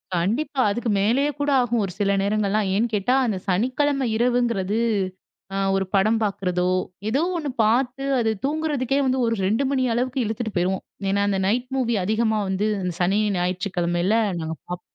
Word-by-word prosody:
கண்டிப்பா. 235 - -1
அதுக்கு 240 +2 -2
மேலேயே 265 +8 +2
கூட 290 0 0
ஆகும். 240 -2 0
ஒரு 185 - -6
சில 200 -1 +2
நேரங்கள்லாம் 205 0 0
ஏன்னு 230 +4 +2
கேட்டா 210 +6 +1
அந்த 200 -4 -1
சனிக்கிழமை 260 +7 +1
இரவுங்கிறது 235 -4 +1 0.8
அ - - -1 0.2
ஒரு 190 0 0
படம் 215 +4 +3
பார்க்கிறதோ, 180 -3 0 0.4
ஏதோ 270 +7 +1
ஒண்ணு 300 -4 -2
பார்த்து 250 +4 +1
அது 225 -1 +1
தூங்குறதுக்கே 290 -3 0
வந்து 260 0 +1
ஒரு 230 0 +1
2 225 +8 +1
மணி 265 -2 +1
அளவுக்கு 255 +2 -1
இழுத்துட்டு 220 0 -3
போயிருவோம். 180 +2 0 0.3
ஏன்னா, 200 +1 +1
அந்த 195 -1 +1
நைட் 245 +4 0
மூவி 235 -3 +1
அதிகமா 220 +2 +1
வந்து 195 +3 0 0.3
சனி, 190 +4 +2 0.2
ஞாயிற்றுக்கிழமையில 180 +1 0 0.2
நாங்க 160 0 -3
பார்ப்போம். 180 0 -7
220 Hz, 155 wpm, -23 LUFS, 195-255 Hz, 0.8 s, படம்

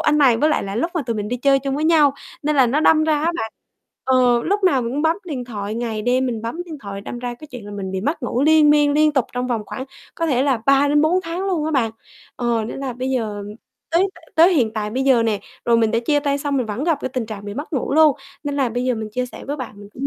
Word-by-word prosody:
anh 300 0 +2
này 260 -5 +5
với 300 +7 +2
lại 300 - +1
là 195 +2 -5
lúc 335 +8 0
mà 330 - 0
tụi 230 -3 -3
mình 210 0 -3
đi 245 - -2
chơi 275 +2 +3
chung 270 0 -3
với 300 +2 -1
nhau, 300 -4 +4 0.3
nên 300 0 0
là 260 -2 +5
nó 280 +6 +1
đâm 310 0 +4
ra 310 -1 +2
á 335 +2 +1
bạn 220 -8 -4 0.5
ờ, 250 -2 +3
lúc 400 +2 0
nào 275 -9 +3
mình 235 +1 -3
cũng 290 +3 -1
bấm 320 +3 +2
điện 265 -6 -4
thoại, 210 -3 -5
ngày 225 -2 -3
đêm 255 +2 +1
mình 230 -3 -3
bấm 280 +10 -4
điện 320 -4 -8
thoại 200 -4 -7
đâm 240 +4 -7
ra 245 0 -4
cái 305 +5 -12
chuyện 245 -5 -10
là - - -8
mình 190 -2 -5
bị 190 - -2
mất 290 - -2
ngủ 245 +2 -1
liên 310 -1 +5
miên, 295 -1 +4
liên 305 0 +3
tục 265 -4 +2
trong 250 0 -2
vòng 235 -4 -1
khoảng 260 - -6 0.3
có 330 - -1
thể 260 -3 +2
là 275 -3 +2
3 275 +1 +5
đến 295 +1 +3
4 355 +4 +3
tháng 350 +3 -4
luôn 345 -6 0
á 315 - -1
bạn. 245 -7 +1 0.5
Ờ, 235 -2 0
nên 225 - -6
là 270 -2 -3
bây 255 +2 -3
giờ 215 -5 -2 0.5
tới 350 +4 +3 0.3
tới 340 +3 +6
hiện 230 -7 +2
tại 210 -1 -3
bây 260 +4 -1
giờ 260 -4 +4
nè, 215 -3 0 0.2
rồi 235 -1 +4
mình 225 -1 +2
đã 230 - +1
chia 290 -1 +3
tay 285 -1 0
xong 280 -1 -1
mình 250 -4 0
vẫn 220 +8 -3
gặp 325 -4 +1
cái - - -2
tình 250 -3 -3
trạng 205 -2 -7
bị 205 0 -6
mất 290 +6 -6
ngủ 270 -2 -1
luôn 310 -3 +5 0.3
nên 285 0 -2
là 265 -3 +2
bây 245 +2 -2
giờ 255 -1 +1
mình 220 -1 -5
chia 250 +1 -1
sẻ - - -11
với 290 +2 -3
bạn 255 -4 -6
mình 205 - -11
cũng 275 +2 -3
260 Hz, 300 wpm, -21 LUFS, 230-300 Hz, 0.5 s, tới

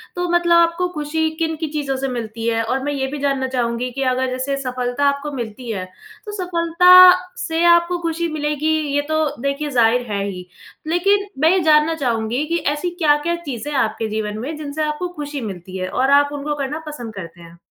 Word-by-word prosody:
तो 355 0 -1
मतलब 345 0 +3
आपको 340 +1 +2
खुशी 315 +1 -1
किन-किन 320 -1 -2
चीज़ों 290 -3 -2
से 270 +1 -2
मिलती 230 -3 -5
है? 225 -1 +1
और 260 +4 -2
मैं 290 +1 -2
ये 265 -1 -2
भी 295 - -5
जानना 275 -2 0
चाहूँगी 245 -1 -2
कि 275 +2 -3
अगर 260 +1 -1
जैसे 260 +2 -2
सफलता 250 +1 -2
आपको 280 +1 -3
मिलती 235 0 -6
है, 190 -4 -4 0.4
तो 420 - -6
सफलता 360 +1 +7 0.4
से 325 +1 0
आपको 340 +1 +4
खुशी 335 0 -1
मिलेगी, 300 0 -1 0.2
ये 290 - +3
तो 315 0 +2 0.2
देखिए 280 +2 -2
ज़ाहिर 240 -2 +3
है 200 -1 -1
ही। 180 -2 -7 0.4
लेकिन 395 +5 +2
मैं 315 - +5
ये 375 - +3
जानना 310 +1 +4
चाहूँगी 240 -1 -1
कि 335 +2 0 0.2
ऐसी 295 +4 -3
क्या-क्या 295 +3 +3
चीज़ें 275 +1 -5
हैं 280 - 0
आपके 220 0 -1
जीवन 215 -1 -3
में 280 +8 -5
जिनसे 305 0 -4
आपको 305 +4 -2
खुशी 290 -2 -5
मिलती 190 -3 -7
है 185 0 -3
और 260 +7 +1
आप 285 - -3
उनको 290 +1 -3
करना 290 +2 -3
पसंद 245 -7 -7
करते 170 -3 -9
हैं? 170 0 -14
285 Hz, 200 wpm, -20 LUFS, 245-320 Hz, 0.4 s, सफलता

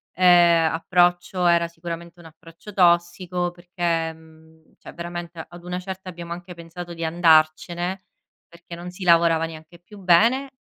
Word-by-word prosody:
ehm, 175 -3 +5
approccio 175 +2 +1
era 170 0 +3
sicuramente 170 +1 -8
un 170 - -15
approccio 165 +5 -15
tossico 175 0 +1
perché 175 -2 -2
mhmm, 160 0 -21
cioè - - -13
veramente 170 -1 -7
ad 175 0 -13
una 180 +1 -4
certa 190 0 -8
abbiamo 170 -1 -9
anche 175 +1 -10
pensato 170 +1 -9
di 165 0 -7
andarcene 170 +2 +2 0.4
perché 170 0 -12
non 175 +1 -8
si 180 +1 -9
lavorava 165 -2 +4
neanche 160 +1 -12
più 205 +5 -16
bene 225 +9 +3
170 Hz, 145 wpm, -23 LUFS, 165-180 Hz, 0.4 s, ehm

